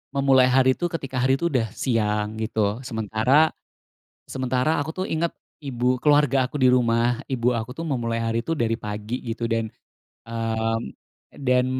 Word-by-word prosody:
memulai 135 -2 +5
hari 130 0 +5
itu 175 - -3
ketika 135 -5 -4
hari 130 +1 +3
itu 170 - -3
udah 115 -3 +1 0.2
siang" 105 -4 +1
gitu, 110 0 -3 0.3
sementara 110 +2 -1 1.0
sementara 130 +2 0
aku 150 - -4
tuh - - -1
inget 165 +1 0 0.3
ibu, 125 -2 -3 0.2
keluarga 145 -2 +4
aku 130 - -9
di 130 - +7
rumah, 120 -1 +2
ibu 120 -2 0
aku 110 - -6
tuh - - -4
memulai 115 -2 -1
hari 115 0 0
itu 165 - -3
dari 115 -1 +1
pagi 105 +3 -5
gitu, 115 +1 -4
dan 115 0 +1 0.7
mmm, 115 -1 -1 0.7
dan 125 0 +4
125 Hz, 160 wpm, -24 LUFS, 115-130 Hz, 1.0 s, di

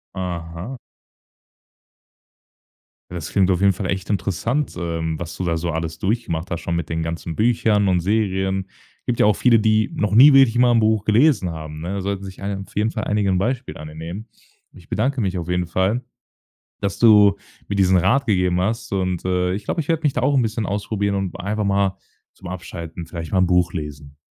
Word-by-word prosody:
Aha. 90 +5 -5 2.3
Das 85 -4 -5
klingt 95 -2 +3
auf 90 0 0
jeden 100 -1 +5
Fall 95 +2 -5
echt 95 -1 -3
interessant, 110 - -1
ähm, 80 -2 -3
was 85 -1 -6
du - - -3
da 85 -2 0
so 85 +1 -3
alles 80 +1 -4
durchgemacht 95 -5 -2
hast 85 -1 -3
schon 85 - -2
mit 85 -2 -3
den 80 0 -2
ganzen 80 0 -4
Büchern 110 -3 +2
und 90 -1 +3
Serien. 95 -1 0 0.4
Gibt 120 - -1
ja - - +5
auch 105 - +4
viele, 120 0 +4
die 110 +4 +2
noch 105 -10 0
nie 140 +5 +9
wirklich 135 -4 +5
mal 125 0 +5
'n 115 - +4
Buch 110 -1 +2
gelesen 110 - +3
haben, 80 -1 -7
ne? 90 +4 -4
Da 100 - -3
sollten 100 0 -3
sich 95 0 -9
einig 100 0 -3
auf - - -20
jeden 105 +2 +1
Fall 110 -1 -4
einige 105 -1 0
'n 95 - +2
Beispiel 125 +6 -2
an 75 - -8
dir 75 - -11
nehmen. 85 +8 -7 0.5
Ich - - -17
bedanke 130 +4 0
mich 95 -3 -1
auf 85 - -4
jeden 90 -1 0
Fall, 95 +8 0 0.8
dass 100 -2 -2
du 105 -3 +6 0.3
mir 100 - -3
diesen 95 -1 +4
Rat 125 +11 +2
gegeben 90 -3 +2
hast. 115 +2 -2
Und 90 -3 -1
äh, 90 0 +1
ich 105 +1 -7
glaube, 165 - -1
ich 145 - -9
werde 165 -1 0
mich 145 -3 +2
da 125 - -1
auch 140 +3 +2
'n - - +4
bisschen 110 -1 -2
ausprobieren 100 0 -1
und 95 -3 -3
einfach 105 +3 -2
mal 100 -1 +1 0.4
zum 95 - -12
Abschalten 85 -2 -7
vielleicht 80 -1 -7
mal 95 - +2
'n 90 - +3
Buch 90 -1 +2
lesen. 75 -3 -7
95 Hz, 210 wpm, -21 LUFS, 85-110 Hz, 2.3 s, nie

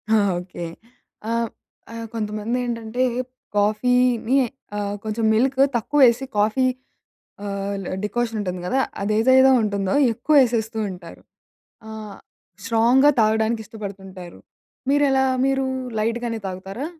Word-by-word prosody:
ఆ! - - +5 0.2
ఓకే. 175 -1 -7 0.6
ఆహ్, 230 0 0 0.4
ఆహ్, 230 0 -6
కొంతమందేంటంటే, 230 +2 -2 0.5
కాఫీని 245 +4 +2 0.4
ఆహ్, 205 0 -2
కొంచెం 220 +1 -2
మిల్క్ 260 +4 +1 0.2
తక్కువ 260 +6 0
వేసి 245 +2 +3
కాఫీ 215 +5 +2 0.8
ఆహ్, 200 0 -3 0.3
డికాషన్ 230 +1 -2
ఉంటుంది 180 -3 -4
కదా! 265 +8 +1 0.2
అదేదైతే 255 +6 +5
ఉంటుందో 200 -2 -1 0.2
ఎక్కువ 245 +7 0
వేసేస్తూ 225 -3 0
ఉంటారు. 180 -2 -11 0.7
ఆహ్, 215 -2 -8 0.5
స్ట్రాంగ్‌గా 235 +5 +4
తాగడానికి 220 +1 +1
ఇష్టపడుతుంటారు. 195 -4 -9 0.5
మీరెలా? 275 -2 +3 0.2
మీరు 270 0 +1 0.3
లైట్‌గానే 230 +1 -1
తాగుతారా? 190 +8 -5
225 Hz, 100 wpm, -22 LUFS, 205-245 Hz, 0.8 s, ఆ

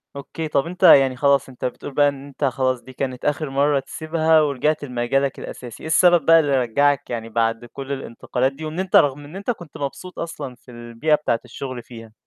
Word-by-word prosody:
أوكي، 150 +3 -6
طَب 140 -1 +1
أنت 180 +2 -7
يعني 135 -7 +7
خلاص، 140 0 +2
أنت 125 - -7
بتقول 125 +2 -5
بقى 145 +1 +4
إن 140 -1 -8
أنت 140 +1 -8
خلاص 130 -1 0
دي 130 - -13
كانت 130 -1 -4
آخر 150 0 0
مرّة 140 +1 +2
تسيبها، 155 +3 +1
ورجعت 150 +1 0
لمجالك 135 +1 -1
الأساسي، 120 -2 -9
إيه - - -5
السبب 175 -1 +4
بقى 165 0 +7
اللي 140 -4 +2
رجّعك 140 +3 +1
يعني 115 -1 -4
بَعد 115 +1 0
كلّ 135 +3 -8
الانتقالات 130 0 -2
دي؟ 155 +3 -8
وإن 155 +3 -5
أنت 190 0 -1
رغم 145 0 +4
إن 150 +6 -12
أنت 200 +5 -2
كنت 175 -9 -9
مبسوط 145 +6 -6
أصلًا 150 -6 -6
في 125 - -17
البيئة 120 +6 0
بتاعة 150 -6 -1
الشغل 125 0 -7
فيها؟ 115 -2 -12
140 Hz, 205 wpm, -22 LUFS, 125-155 Hz, -, يعني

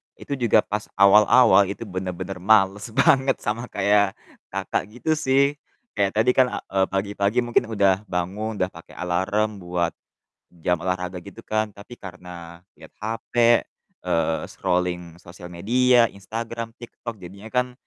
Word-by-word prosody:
itu - - -6
juga 110 -3 +4
pas 105 0 -4
awal-awal 100 0 +6
itu 100 - -5
bener-bener 95 -1 -5
males 100 +1 +3
banget 135 -1 +4
sama 115 +3 -2
kayak, 100 0 +2 0.3
Kakak, - - -2
gitu 160 - -2
sih. 135 -2 +3 0.5
Kayak 100 -1 +1
tadi 115 +3 +3
kan, 130 0 +4
a - - -3
eee, 95 0 +2
pagi-pagi 100 +3 0
mungkin 120 0 +1
udah 100 -2 +4
bangun, 100 +5 -3
udah 95 -2 -1
pake 85 - -14
alarm 95 +4 -1
buat 90 -1 -1 0.7
jam 90 0 +2
olahraga 90 0 -3
gitu 100 +5 -12
kan. 110 -2 -2
Tapi 100 +4 -12
karena 90 -2 -10 0.2
lihat - - -15
HP, 115 +1 -5 0.7
eee, 80 -1 +1
scrolling 90 -2 -2
sosial 90 0 -12
media, 120 +7 +3
Instagram, 115 +3 -6
TikTok 120 -1 -9
jadinya 100 +5 -10
kan 125 0 0
100 Hz, 140 wpm, -23 LUFS, 90-115 Hz, 0.7 s, awal-awal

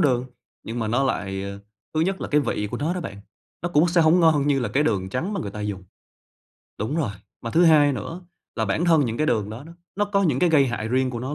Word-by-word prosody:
đường, 125 -6 +2 0.4
nhưng 115 +2 -5
mà 110 -2 -1
nó 120 +5 +1
lại 95 -6 -2 0.5
thứ 155 - +1
nhất 190 +4 0
là - - -4
cái 150 - +3
vị 105 -6 -2
của 120 - -3
nó 160 +5 -1
đó 180 - -3
bạn, 135 - -6 0.5
nó 175 - -1
cũng 170 0 +3
sẽ 175 0 +3
hông 165 +2 +5
ngon 155 -4 +4
như 140 -2 +2
là 120 - -1
cái 145 - +1
đường 100 -10 0
trắng 155 - -3
mà 205 - -2
người 100 - -4
ta 105 +1 -7
dùng. 100 -3 -4 0.9
Đúng 110 +9 -2
rồi, 150 -11 0 0.3
mà 115 - -5
thứ 170 +8 +4
hai 150 -3 +6
nữa 165 +6 -5 0.4
là 110 - +1
bản 110 - 0
thân 165 -4 +4
những 115 -2 -2
cái 155 - 0
đường 105 -9 0
đó 115 +6 -8
đó, 165 - -12 0.2
nó 205 - +2
có 200 -1 +1
những 150 -8 +1
cái 175 +2 +3
gây 145 -4 +5
hại 110 -3 -3
riêng 130 +1 +1
của 120 - -5
nó 130 +4 -4
140 Hz, 270 wpm, -24 LUFS, 115-165 Hz, 0.9 s, hai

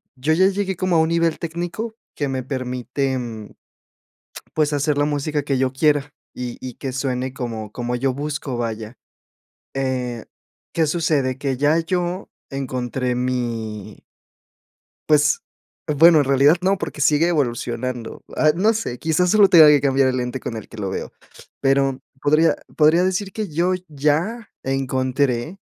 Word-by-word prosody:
yo 135 +4 -1
ya 185 +4 +5
llegué 195 -1 -1
como 185 -1 0
a - - +5
un 160 0 +2
nivel 165 -1 +1
técnico 175 +7 -4 0.2
que 145 - -1
me 130 -1 -2
permite, 130 +1 -2 1.4
pues, 155 -1 +1
hacer 145 0 +1
la 145 - +3
música 145 0 -1
que 140 -2 0
yo 130 0 +1
quiera, 145 +1 +1 0.2
y 125 -1 -5
y 130 -2 -7
que 135 - -5
suene 130 -1 -2
como 115 -4 -5
como 120 +1 -3
yo 130 +1 0
busco, 145 -2 -4
vaya, 115 0 -4 0.8
eh, 125 -3 -2 0.5
¿qué 165 -1 +2
sucede?, 145 -5 0
que 135 -2 -1
ya 145 +4 +3
yo 180 +2 -2 0.2
encontré 125 -2 -2
mi 115 -5 -3 1.1
pues, 150 0 +4 0.5
bueno, 160 +2 +6
en 145 - +3
realidad 140 +4 +5
no, 190 +1 +2
porque 150 - -5
sigue 150 +4 +4
evolucionando, 120 -5 -2
ay, 155 0 +4
no 215 +5 +3
sé, 165 - -3
quizás 165 +3 +1
solo 205 -1 +6
tenga 160 -4 +8
que 150 -1 +6
cambiar 135 -1 +3
el 130 - 0
lente 125 +1 -3
con 115 - -5
el 110 - -8
que 115 - -12
lo 100 -2 -3
veo, - - -5 0.5
pero, 135 -1 +2 0.2
podría 155 +3 +3 0.2
podría 160 +4 +5
decir 190 +1 -1
que 215 0 -3
yo 175 +4 +1 0.2
ya 155 +10 -1
encontré 135 +3 -1
140 Hz, 155 wpm, -21 LUFS, 125-160 Hz, 1.4 s, tenga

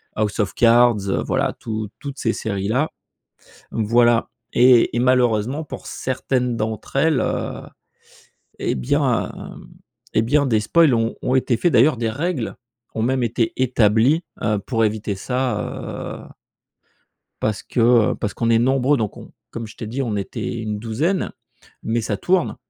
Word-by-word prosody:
House 105 0 -1
of 100 -2 0
Cards, 115 -4 +4
heu, - - 0
voilà, - - 0
toutes 110 -2 -4
toutes 140 -1 -7
ces 115 - 0
séries 100 -2 -3
là. 130 +8 +1 0.8
Mmh 110 - -1
voilà, 120 +1 +3 0.2
et 125 -1 +5
et - - +2
malheureusement, 125 +2 +2
pour - - -9
certaines 125 -1 -2
d'entre 110 +2 -4
elles, 150 0 +3
heu, - - -2 1.0
et - - -1
bien 65 -2 0 0.8
et 110 - +4
bien 140 +5 +2
des 110 -4 +2
spoils 155 +5 +4
ont 115 0 0
ont 130 - 0
été 125 -2 +1
faits. 175 +7 +1
D'ailleurs 130 +4 +5
des 115 -1 -1
règles 145 0 -2 0.4
ont 110 - -1
même 130 +2 +1
été 115 -1 0
établies, 125 +4 +3 0.2
heu, 105 -1 +1
pour 115 +3 0
éviter 105 -1 -1
ça, 125 +6 -1 0.6
heu - - -12 1.2
parce 105 -2 -1
que, 120 - -2 0.3
heu, - - -2
parce 105 - -4
qu'on 115 -1 0
est 115 - +5
nombreux 135 +3 +2
donc 110 -5 -3
on - - -12 0.2
comme 115 -2 -6
je - - -14
t'ai 110 - -6
dit, 125 +5 -3
on 115 -5 -2
était 105 +3 -4
une 105 -1 -3
douzaine 150 - -1 0.5
mais 115 +1 0
ça 110 -2 -2
tourne 180 - +1
115 Hz, 165 wpm, -21 LUFS, 110-130 Hz, 1.2 s, et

